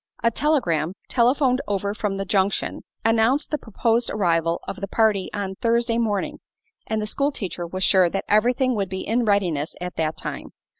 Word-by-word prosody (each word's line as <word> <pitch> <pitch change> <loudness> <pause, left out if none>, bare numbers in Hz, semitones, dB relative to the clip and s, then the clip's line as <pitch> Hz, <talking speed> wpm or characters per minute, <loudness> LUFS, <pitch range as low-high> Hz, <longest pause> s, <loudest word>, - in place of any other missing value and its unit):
A 230 - +4
telegram, 185 - +1 0.2
telephoned 255 +1 +3
over 200 0 -1
from 210 -2 -2
the 195 - -3
junction, 195 0 0 0.2
announced 225 +5 +2
the 300 - 0
proposed 230 +2 0
arrival 170 -4 +1
of 190 - -6
the 200 - -2
party 210 -2 +2
on 200 -2 -3
Thursday 230 +2 +1
morning, 210 -4 -1 0.5
and 220 0 -1
the 210 - -2
school 280 +7 0
teacher 180 - -4
was 185 +2 -3
sure 185 -2 +5
that 195 - -3
everything 245 +5 +3
would 200 -4 -1
be 190 0 -4
in 235 +2 +1
readiness 180 -7 +1
at 180 0 -6
that 160 -1 -1
time. - - -6
205 Hz, 180 wpm, -23 LUFS, 190-235 Hz, 0.5 s, sure